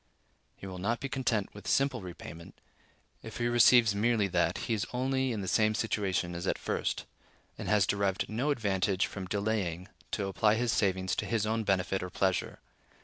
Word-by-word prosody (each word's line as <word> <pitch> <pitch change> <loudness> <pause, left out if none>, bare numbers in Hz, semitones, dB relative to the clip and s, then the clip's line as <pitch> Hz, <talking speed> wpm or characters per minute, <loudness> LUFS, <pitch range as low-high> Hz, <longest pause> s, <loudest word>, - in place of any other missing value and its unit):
He - - -11
will 95 -1 -7
not 115 +6 -1
be 135 - -3
content 125 -7 -1
with 105 - -11
simple 135 -3 +2
repayment; 85 -2 -10 0.6
if - - -8
he 120 - -1
receives 120 -2 +6
merely 110 +1 +2
that, - - +1
he - - 0
is 105 - -1
only 130 +1 0
in 110 -3 -3
the 95 - -5
same 110 +3 +2
situation 95 -6 -1
as 85 +2 -4
at - - +1
first, - - -2 0.5
and - - -7
has 105 -3 +4
derived 100 -2 0
no 120 +7 -1
advantage 100 -6 +1
from 95 -2 -6
delaying 100 -3 -2 0.2
to 100 - -2
apply 105 +2 +2
his 120 +1 +1
savings 95 -3 +1
to - - -2
his 115 -2 0
own 110 +1 0
benefit 95 -1 0
or 90 - -4
pleasure. 95 0 -1
105 Hz, 185 wpm, -30 LUFS, 95-115 Hz, 0.6 s, receives